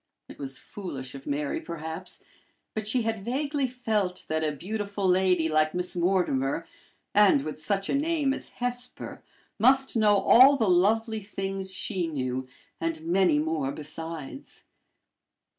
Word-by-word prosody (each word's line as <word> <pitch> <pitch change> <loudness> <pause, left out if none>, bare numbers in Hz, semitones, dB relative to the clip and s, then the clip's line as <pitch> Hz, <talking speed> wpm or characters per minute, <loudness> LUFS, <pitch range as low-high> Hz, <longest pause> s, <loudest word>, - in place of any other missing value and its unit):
It - - -13
was 135 -2 -5
foolish 135 -10 -7
of 135 0 -10
Mary, 145 0 -1
perhaps, 165 +2 -7 0.5
but 215 -1 -3
she 240 +2 +1
had 220 -3 -2
vaguely 280 +4 -1
felt 215 -7 -2
that 160 0 0
a 155 - +1
beautiful 200 +5 -3
lady 180 -2 +3
like 155 +1 +2
Miss 180 0 -2
Mortimer, 170 -5 +1 0.5
and 200 -9 +5
with 155 0 -6
such 195 +4 -1
a - - -1
name 290 -1 +1
as - - -6
Hesper, 245 0 -4 0.4
must 265 +4 +4
know 215 -2 +5
all 260 +7 +7
the 225 -5 +1
lovely 220 +5 +3
things 195 -1 -4
she 185 -2 -2
knew, 130 -4 -3 0.3
and 165 -1 -2
many 175 -2 +3
more 150 -3 0
besides. 160 - -7
185 Hz, 140 wpm, -27 LUFS, 155-220 Hz, 0.5 s, all